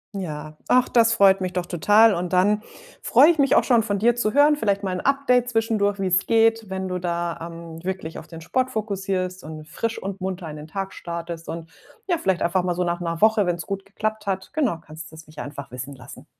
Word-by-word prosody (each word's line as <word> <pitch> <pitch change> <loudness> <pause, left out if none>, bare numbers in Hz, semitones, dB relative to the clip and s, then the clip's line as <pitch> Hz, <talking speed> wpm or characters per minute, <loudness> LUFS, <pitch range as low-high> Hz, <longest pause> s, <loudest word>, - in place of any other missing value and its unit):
Ja, 155 -5 -6
ach, 255 0 +3
das 230 -1 +4
freut 195 -2 +5
mich 185 -1 -3
doch 180 -1 -2
total 210 +6 +4
und 175 +1 -3
dann 205 +4 +3 0.4
freue 300 - +6
ich 340 - +3
mich 275 -1 +4
auch - - +5
schon 240 -3 +4
von 205 -2 -1
dir 235 +4 +3
zu 225 -3 -1
hören, 290 +2 +5
vielleicht 200 -6 0
mal 190 - -1
'n 185 - -3
Update 260 -3 +2
zwischendurch, 215 -3 0
wie's 185 0 +1
geht, 225 -2 +3
wenn 190 0 -4
du 180 0 -2
da, 170 -1 -2
ähm, 165 -1 -8
wirklich 185 -4 -4
auf - - -13
den 165 -1 -10
Sport 255 +10 -1
fokussierst 195 -4 -3
und 155 0 -8
frisch 230 0 -3
und 195 0 -5
munter 185 -3 -4
in 150 - -8
den 150 +1 -9
Tag 195 +4 -4
startest 170 -1 -6
und 165 0 -7 0.4
ja, 345 - +2
vielleicht 190 - 0
einfach 180 +1 +1
mal 175 -1 -1
so 180 - 0
nach 175 0 -1
'ner 165 -1 -4
Woche, 220 -1 +4
wenn's 175 -2 -2
gut 195 +2 -5
geklappt 215 +1 -4
hat, 190 -1 -3
genau, 260 - 0
kannst 155 +1 -10
du's 160 0 -12
mich 155 0 -13
einfach 140 -2 -7
wissen 125 +3 -7
lassen. 130 - -13
190 Hz, 225 wpm, -23 LUFS, 170-220 Hz, 0.4 s, freue